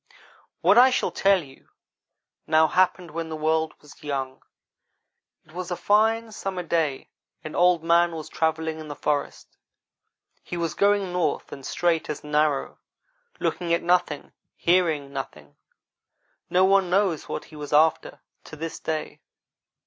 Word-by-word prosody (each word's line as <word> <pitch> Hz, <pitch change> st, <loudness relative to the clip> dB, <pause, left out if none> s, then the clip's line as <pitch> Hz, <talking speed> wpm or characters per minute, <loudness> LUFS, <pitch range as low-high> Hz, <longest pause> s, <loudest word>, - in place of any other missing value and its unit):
"What -, -, +6 dB
I 255 Hz, +1 st, +8 dB
shall 255 Hz, -, 0 dB
tell 195 Hz, -3 st, +3 dB
you 135 Hz, -2 st, -18 dB, 0.8 s
now 155 Hz, 0 st, +5 dB
happened 180 Hz, 0 st, +1 dB
when 165 Hz, +1 st, -4 dB
the 160 Hz, -, -4 dB
world 160 Hz, 0 st, 0 dB
was 150 Hz, -, -17 dB
young. 135 Hz, -3 st, -4 dB, 1.0 s
It -, -, -21 dB
was 180 Hz, +2 st, -6 dB
a 175 Hz, -, -2 dB
fine 220 Hz, +4 st, +2 dB
summer 190 Hz, -3 st, -4 dB
day, 160 Hz, -5 st, -1 dB, 0.3 s
and 155 Hz, -, -7 dB
Old 175 Hz, -2 st, +3 dB
man 170 Hz, +1 st, +4 dB
was 160 Hz, -2 st, -6 dB
travelling 160 Hz, 0 st, -1 dB
in 155 Hz, -, -8 dB
the 145 Hz, -, -6 dB
forest. 145 Hz, -1 st, -3 dB, 0.8 s
He 175 Hz, -, -6 dB
was 165 Hz, -2 st, -2 dB
going 200 Hz, -2 st, +2 dB
north 170 Hz, -5 st, -1 dB
and 135 Hz, -, -9 dB
straight 170 Hz, +3 st, 0 dB
as 150 Hz, -, -5 dB
an 150 Hz, 0 st, -9 dB
arrow 150 Hz, -2 st, +1 dB, 0.6 s
looking 170 Hz, -1 st, 0 dB
at 170 Hz, -, -4 dB
nothing, 175 Hz, -4 st, 0 dB, 0.2 s
hearing 160 Hz, -6 st, +1 dB
nothing. 75 Hz, -, -7 dB, 0.9 s
No 185 Hz, +1 st, +4 dB
one 195 Hz, -1 st, +3 dB
knows 185 Hz, -4 st, +1 dB
what -, -, -4 dB
he -, -, -10 dB
was 150 Hz, -1 st, -7 dB
after, 150 Hz, -2 st, +2 dB, 0.2 s
to -, -, -10 dB
this 165 Hz, +1 st, -6 dB
day. 155 Hz, -1 st, -4 dB
160 Hz, 150 wpm, -25 LUFS, 150-180 Hz, 1.0 s, I